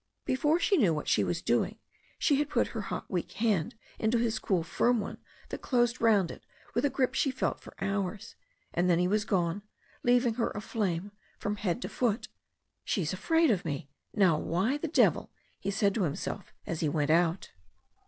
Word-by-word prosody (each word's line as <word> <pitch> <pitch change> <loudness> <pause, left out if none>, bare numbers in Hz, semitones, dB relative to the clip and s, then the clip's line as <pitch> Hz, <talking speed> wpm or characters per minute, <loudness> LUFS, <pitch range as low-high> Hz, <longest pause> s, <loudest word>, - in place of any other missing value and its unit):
Before 300 +5 +2
she 390 +3 +3
knew 190 - +4
what 150 - -4
she - - +3
was - - -2
doing - - +1 0.4
she 285 - +3
had 295 0 0
put 240 - +1
her 225 - -2
hot 200 - -4
weak 180 -3 -3
hand 210 -8 0 0.2
into 220 +2 +2
his 230 -1 0
cool 180 -4 0
firm 235 +8 +2
one 200 - -5 0.3
that - - -5
closed 240 -1 +1
round 210 -6 +4
it - - -11 0.3
with - - +1
a - - +3
grip 260 -1 0
she 275 - +2
felt 260 - -1
for - - -13
hours, 195 +1 -2 0.4
and 180 +1 +2
then 170 - +4
he 180 +1 +2
was 210 +2 +1
gone, 180 -1 0 0.4
leaving 245 -1 +3
her 230 0 0
aflame 205 -3 -2 0.3
from 205 0 -3
head 205 +4 -1
to - - -2
foot. 235 -2 -1 0.5
"She 195 - 0
is 155 - -2
afraid 325 - +3
of 195 -5 0
me! 145 -3 -4 0.2
Now 185 -7 +3
why 195 - 0
the 325 - -2
devil 310 - +3 0.2
" - - -38
he 195 - -3
said 200 0 +2
to 215 - -1
himself 175 +4 -4
as 165 - -3
he 155 - +1
went 150 0 +1
out. 170 +2 +2
205 Hz, 200 wpm, -30 LUFS, 175-240 Hz, 0.5 s, knew